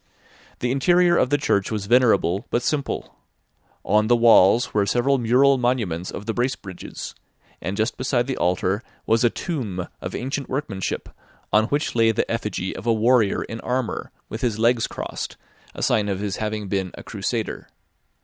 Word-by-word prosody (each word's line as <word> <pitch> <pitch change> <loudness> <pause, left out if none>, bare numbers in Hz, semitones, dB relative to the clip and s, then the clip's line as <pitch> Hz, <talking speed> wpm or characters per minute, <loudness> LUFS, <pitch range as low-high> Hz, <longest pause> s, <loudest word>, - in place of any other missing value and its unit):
The 125 - 0
interior 175 +6 +4
of 130 - +2
the 145 - +3
church 100 -8 +1
was 105 -3 -3
venerable 110 -4 +3
but 120 - 0
simple; 145 -3 -2 0.7
on 105 0 +3
the 120 - +5
walls 115 0 +5
were 100 -1 +2
several 130 +6 +2
mural 130 +3 +4
monuments 110 -9 -1
of 105 - -7
the 115 - -2
Bracebridges, 120 -7 -4 0.5
and 95 +5 -3
just 110 0 0
beside 125 -1 0
the 135 0 -2
altar 90 +3 0 0.2
was 115 +1 +2
a 120 - +5
tomb 110 - -4
of - - -5
ancient 135 +2 -3
workmanship, 110 -9 -3 0.5
on 105 +2 +5
which 145 +5 -1
lay 115 -1 +4
the 110 - -1
effigy - - -3
of - - -7
a - - +5
warrior 115 -1 +3
in 115 - -7
armour, 125 -1 -2 0.2
with 110 - -6
his 115 -4 0
legs 115 +1 +2
crossed, - - -6 0.4
a - - -4
sign 105 -1 +2
of 95 -1 -2
his 100 -1 -3
having 105 -1 -3
been 95 -1 -1
a - - -10
crusader. - - -3
115 Hz, 170 wpm, -23 LUFS, 100-130 Hz, 0.7 s, the